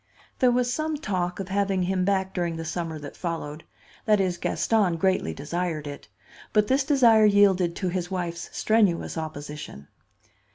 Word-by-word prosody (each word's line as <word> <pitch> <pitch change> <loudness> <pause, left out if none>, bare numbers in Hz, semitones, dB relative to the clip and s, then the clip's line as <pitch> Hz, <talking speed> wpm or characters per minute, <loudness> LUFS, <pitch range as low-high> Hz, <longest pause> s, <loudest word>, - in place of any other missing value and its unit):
There 255 - +5
was 245 0 +1
some 310 +2 -2
talk 185 - -2
of 195 -1 -5
having 195 -1 +1
him 185 0 0
back 190 -1 0
during 170 -2 -1
the 165 0 -5
summer 165 -1 -3
that 145 -2 -9
followed. 165 -3 -5 0.4
That 210 -2 +4
is, 180 -3 0
Gaston 200 -7 +1
greatly 185 - +1
desired 160 - -3
it; 145 -1 -8 0.5
but 210 -1 +4
this 265 +5 +2
desire 240 -6 +5
yielded 195 -4 +4
to 185 - -2
his 180 0 -3
wife's 175 -3 -4
strenuous 210 -6 +1
opposition. 150 - -7
185 Hz, 160 wpm, -25 LUFS, 165-210 Hz, 0.5 s, There